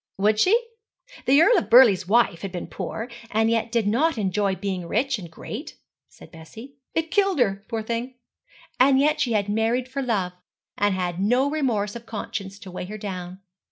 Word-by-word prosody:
'Would 210 +2 +2
she? 410 - +5 0.7
The 275 +3 +6
Earl 455 +2 +5
of - - -7
Burleigh's 220 -7 +6
wife 210 -6 +2
had 195 - -5
been 175 - -5
poor, 225 - -5 0.2
and 220 +1 +2
yet 230 0 0
did 230 -3 +1
not 265 +8 +1
enjoy 200 -1 0
being 185 -2 -4
rich 255 +5 0
and 175 -3 -9
great,' 220 - -8 0.3
said - - -16
Bessie. 220 - -12 0.2
'It 325 0 -1
killed 395 -4 +2
her, 200 -6 +1
poor 225 -2 -3
thing. 235 +3 -4 0.6
And 265 +1 +5
yet 300 +2 +2
she 245 -5 +1
had 205 -2 +1
married 225 +4 0
for 275 +2 -4
love, 200 -8 -1 0.4
and 205 -1 +1
had 180 -1 -3
no 250 +7 +2
remorse 235 -9 -1
of 235 0 -9
conscience 200 -2 -5
to 190 -4 -10
weigh 180 - -5
her 210 +3 -7
down.' 185 -2 -7
220 Hz, 190 wpm, -24 LUFS, 195-255 Hz, 0.7 s, The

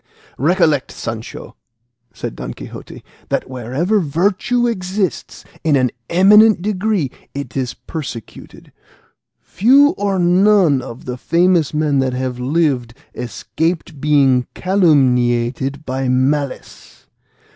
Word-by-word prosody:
"Recollect, 155 - +2
Sancho," 110 0 -7 0.6
said 110 - -7
Don - - -7
Quixote, - - -10 0.3
"that - - -1
wherever 130 - -1
virtue 195 - 0
exists 190 -4 -3 0.2
in 155 -2 +2
an 130 -3 +2 0.2
eminent 205 +2 +5
degree 200 - -1 0.2
it 140 0 -6
is 130 -3 -2
persecuted. 140 -8 -9 0.7
Few 270 +9 +4
or 200 -1 0
none 180 -4 +3
of 120 0 -10
the 125 0 -5
famous 170 +2 +2
men 150 -2 0
that 130 -1 0
have 125 -1 -3
lived 130 -4 0 0.2
escaped 150 - -4
being 135 -4 +3
calumniated 135 -6 +1
by 130 0 -2
malice. 135 +2 -2
150 Hz, 105 wpm, -18 LUFS, 130-185 Hz, 0.7 s, eminent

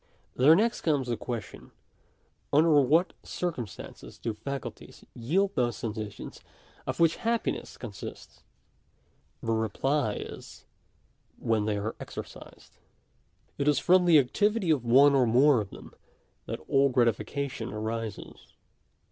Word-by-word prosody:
There 145 +6 +6
next 230 +5 +1
comes 145 -5 +1
the 120 - +1
question 115 -2 -7 0.4
— - - -42
under 155 +3 +4
what 150 +5 +4
circumstances 140 - -6
do 115 - -3
the 105 - -21
faculties 140 -2 -7
yield 185 +12 0
those 120 - 0
sensations 110 -2 -6 0.5
of - - -3
which 165 -1 +4
happiness 230 0 -2
con 120 - -7
sists? 100 - -10 1.0
The 115 - -1
reply 110 +2 0
is - - -9 0.3
— - - -41
when 110 -2 0
they 105 -1 0
are 105 +2 -3
exercised. - - -10 0.8
It 140 - 0
is 150 - +4
from 180 0 +4
the 170 -3 +7
activity 200 - +2
of 140 -6 +1
one 135 +4 +6
or 130 -3 +4
more 125 +2 +5
of 100 - -7
them - - -12 0.5
that - - -5
all 140 0 +4
gratification 120 +1 -1
arises. 110 0 -6
130 Hz, 135 wpm, -28 LUFS, 115-155 Hz, 1.0 s, the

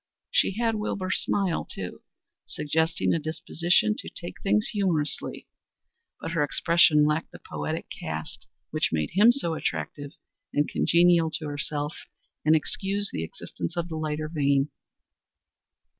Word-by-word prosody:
She - - +3
had 230 -1 +2
Wilbur's 205 -3 -1
smile 195 -4 0
too, 90 -2 -7 0.5
suggesting 160 +3 +1
a 165 - +1
disposition 160 -5 +2
to - - -5
take - - -8
things 105 +1 +2
humorously; 170 -8 -1 0.7
but - - -5
her 165 -3 +2
expression 155 0 +4
lacked 150 +2 0
the - - -10
poetic 75 0 -4
cast 80 0 -5 0.2
which - - +1
made 75 -1 -1
him 210 +6 +7
so 240 -11 -2
attractive 145 -2 -3 0.4
and 145 0 +3
congenial 170 -1 +4
to 160 0 -4
herself 145 +1 -3 0.5
and 155 +1 +5
excused 195 +6 0
the 80 - -2
existence 175 - -6
of 170 0 -1
the 160 - -4
lighter 155 0 -2
vein. 140 -2 +1
160 Hz, 135 wpm, -27 LUFS, 145-175 Hz, 0.7 s, him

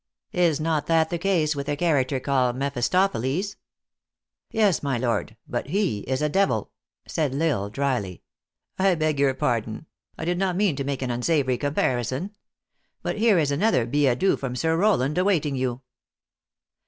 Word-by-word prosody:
Is 170 -4 +2
not 155 -1 -1
that 165 0 +2
the 170 - -1
case 170 -5 +1
with 140 0 -4
a 145 - 0
character 145 -5 +1
called 130 -2 +1
Mephistophiles 140 - 0 0.3
?" - - -67
" - - -60
Yes, 210 -6 +2
my 140 -3 -1
lord; 115 -2 -2
but 120 - -3
he 175 - 0
is 130 +3 -1
a - - +3
devil," 195 +6 +1 0.4
said 150 -5 -1
L - - 0 0.2
Isle, - - -7
drily. 120 -8 -2 0.3
" - - -40
I 190 -1 +4
beg 155 -3 0
your 135 -2 +3
pardon. 115 +1 -2 0.3
I 160 - -5
did 175 +1 0
not 190 -2 0
mean 195 -5 +2
to 140 - -2
make 135 -1 -3
an 125 - -2
unsavory 130 0 +1
comparison. 140 - -1 0.7
But - - -2
here 220 -3 +4
is 150 -3 +2
another 140 - +2
billet 135 0 +2
doux 195 - +2
from 130 -2 -4
Sir 160 +5 +1
Rowland 170 -6 +2
awaiting 170 -7 +1
you." 130 -1 -2
145 Hz, 175 wpm, -24 LUFS, 130-175 Hz, 0.7 s, I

